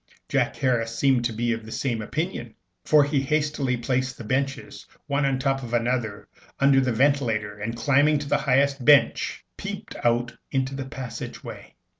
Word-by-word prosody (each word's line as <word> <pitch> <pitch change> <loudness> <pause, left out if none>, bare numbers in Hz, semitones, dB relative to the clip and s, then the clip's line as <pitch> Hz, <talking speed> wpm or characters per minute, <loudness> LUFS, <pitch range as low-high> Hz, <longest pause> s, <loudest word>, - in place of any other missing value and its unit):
Jack - - +1
Harris 115 -3 0
seemed 130 -2 +3
to 120 - 0
be 120 +2 -1
of 115 -1 -5
the 110 - -10
same 120 -3 -2
opinion, 135 - -4 0.3
for 150 -1 +5
he 145 -1 +1
hastily 145 -2 0
placed 125 +1 -1
the - - -8
benches 135 +4 -3 0.2
one 140 -1 0
on 135 - +1
the - - -4
top 135 0 0
of 120 -2 -3
another 120 -3 -1 0.3
under 135 -1 +5
the 130 -1 0
ventilator, 115 -5 +1
and, 115 +3 -3
climbing 145 +3 +3
up 145 - -1
on 140 - -8
the 145 - +3
highest 140 -1 +2
bench, 145 +1 +3
peeped - - -6
out 120 0 +1 0.2
into 135 -1 -1
the 135 -1 -4
passage 125 -2 -7
way. - - -10
130 Hz, 185 wpm, -25 LUFS, 120-140 Hz, 0.3 s, for